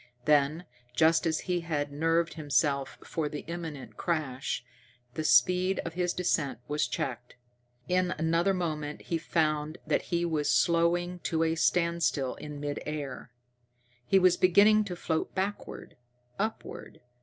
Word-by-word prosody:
Then, 150 +3 +3 0.3
just 160 +3 +4
as 160 -1 0
he 180 -1 -1
had 150 -4 -2
nerved 165 +3 +1
himself 140 -2 0
for 155 -3 -2
the 145 0 -5
imminent 165 -5 -7
crash, 150 -7 -2 0.5
the 155 - -3
speed 180 +8 +4
of 165 - -4
his 175 0 0
descent 165 -6 0
was 150 +1 0
checked. 125 -2 -4 0.5
In 180 0 +2
another 165 +4 +2
moment 155 -4 -3
he 165 - -2
found 155 -1 0
that - - +1
he 170 -1 +1
was 155 -3 0
slowing 175 +1 +2
to 165 -1 0
a 160 0 +1
standstill 170 -5 +1
in 150 -1 -8
mid 145 0 -3
air. 145 -4 -5 0.8
He 195 - +4
was 185 -1 +5
beginning 210 +4 +5
to 180 -3 -5
float 160 -2 -2
backward 195 +2 -4 0.4
upward. 220 +2 -5
165 Hz, 140 wpm, -29 LUFS, 150-175 Hz, 0.8 s, was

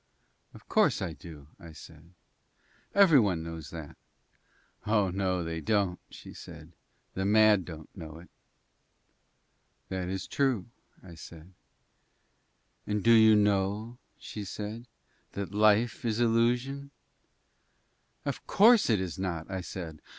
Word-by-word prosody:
"Of - - -16
course - - +2
I 80 - -4
do," 80 -5 -12
I 85 -1 -12
said. 80 +3 -15 0.8
"Every 190 -8 +7
one 95 -7 0
knows 80 -2 -8
that." 80 -4 -9 0.9
"Oh 105 -3 +2
no 95 -1 -1
they 80 0 -4
don't," 95 0 0
she - - -12
said, - - -12 0.4
"the 95 - -3
mad 105 -2 +4
don't 80 -3 -11
know 80 -3 -9
it." 85 +1 -14 1.6
"That 95 -1 -3
is 95 0 -4
true," 130 -9 0 0.4
I 90 -2 -12
said. 85 +2 -13 1.3
"And 105 -1 -1
do 115 - +5
you 110 -1 +7
know," 105 +3 0 0.2
she 105 - -8
said, 105 +4 -7 0.5
"that 100 -1 -5
Life 110 +3 +3
is 115 -1 -1
illusion?" 120 +4 +1 1.4
"Of - - -5
course 225 - +5
it 110 -4 +3
is 95 -1 -5
not," 90 -2 -4
I 95 -1 -3
said. 85 -4 -8
95 Hz, 130 wpm, -29 LUFS, 85-110 Hz, 1.6 s, Every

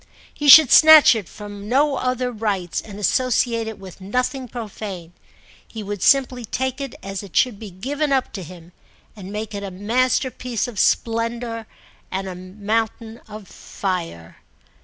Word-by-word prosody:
He 295 - -4
should 305 -1 +10
snatch 315 -3 +9
it 215 -6 -5
from 205 -1 -9
no 280 +3 +2
other 255 0 -1
rites 205 -6 -2
and 205 -2 -11
associate 230 +1 0
it 220 - -6
with 190 -1 -12
nothing 250 +6 -2
profane; 205 -7 -8 0.5
he 220 -2 -8
would 205 -1 -6
simply 260 -3 +3
take 260 +4 -3
it 275 -3 -6
as 195 0 -5
it 200 -4 -13
should 240 -6 +2
be 215 - -8
given 280 - -3
up 265 -2 0
to 195 - -6
him 175 0 -12 0.4
and 195 -2 -10
make 215 +1 -5
it 200 - -5
a 200 - -5
masterpiece 245 +3 -1
of 225 -5 -7
splendour 230 0 -1 0.4
and 190 +1 -4
a 185 - -5
mountain 215 +5 -4
of 210 -2 -10
fire. 170 - -5
220 Hz, 160 wpm, -21 LUFS, 195-250 Hz, 0.5 s, should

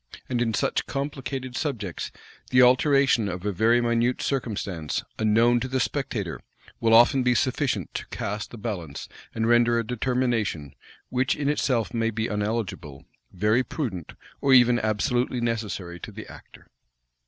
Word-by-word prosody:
And 120 -2 -1
in 115 -2 0
such - - 0
complicated 135 -2 -4
subjects, 115 - -3 0.4
the 125 0 +6
alteration 130 -3 +4
of 90 +1 -6
a 105 - +1
very 115 +5 +3
minute 120 +1 +1
circumstance, 100 - -2 0.2
unknown 115 +3 +4
to 125 - -3
the 130 0 -1
spectator, 115 - -2 0.4
will 115 0 +4
often 120 +4 +6
be 125 -1 +2
sufficient 130 +1 0
to - - -5
cast 105 +1 -4
the 120 - -10
balance, 95 -10 -5 0.3
and 115 0 0
render 120 0 +4
a 115 - -1
determination, 120 - -1 0.4
which 125 +1 +1
in 145 -1 -2
itself 125 -6 0
may 115 -1 +1
be 110 0 -2
uneligible, 105 - -3 0.3
very 105 +7 +2
prudent, 115 - -5 0.3
or 135 -1 +5
even 120 -1 +5
absolutely 120 +4 0
necessary 105 -7 -3
to - - -8
the - - -9
actor. - - -14
115 Hz, 150 wpm, -25 LUFS, 105-125 Hz, 0.4 s, the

